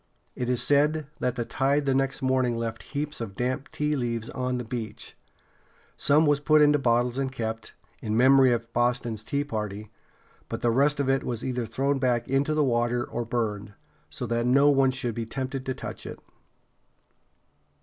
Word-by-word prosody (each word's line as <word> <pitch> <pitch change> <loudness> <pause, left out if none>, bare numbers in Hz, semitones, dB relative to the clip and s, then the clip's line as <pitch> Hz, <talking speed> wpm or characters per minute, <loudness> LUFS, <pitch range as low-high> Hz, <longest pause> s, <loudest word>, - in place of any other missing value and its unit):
It 125 -1 -3
is 125 -1 +2
said 150 +2 +2
that 125 -1 -1
the 120 -2 -2
tide 140 +4 +1
the 135 - +2
next 135 +1 0
morning 130 -2 +1
left 115 -1 -4 0.2
heaps 150 -2 -3
of 100 -4 -6
damp 130 +4 -2
tea 150 0 -1
leaves 120 -3 -3
on 125 -1 -2
the 125 - -3
beach. 115 -1 -6 0.8
Some 150 +3 +3
was 145 -1 +3
put 155 +1 +4
in 150 -1 +6
bottles 125 -2 +1
and 135 -1 -1
kept, 110 -3 -5 0.3
in 110 0 -1
memory 130 +1 +6
of 115 -1 -2
Boston's 120 -2 0
Tea 140 +5 -1
Party; 105 -6 -5 0.6
but - - -4
the 120 - +2
rest 145 +4 +2
of 140 - 0
it 135 0 +2
was 120 -3 -4
either 125 -3 -2
thrown 135 +5 0
back 125 -3 +1
into 140 +3 +1
the 155 - +3
water 120 -1 +1
or 120 - -4
burned, 105 -3 -3 0.3
so - - -5
that 120 +1 0
no 140 +3 +5
one 135 -1 +4
should 130 -2 -2
be 115 0 -4
tempted 130 +2 -4
to 130 - -1
touch - - -7
it. - - -7
125 Hz, 185 wpm, -26 LUFS, 115-135 Hz, 0.8 s, in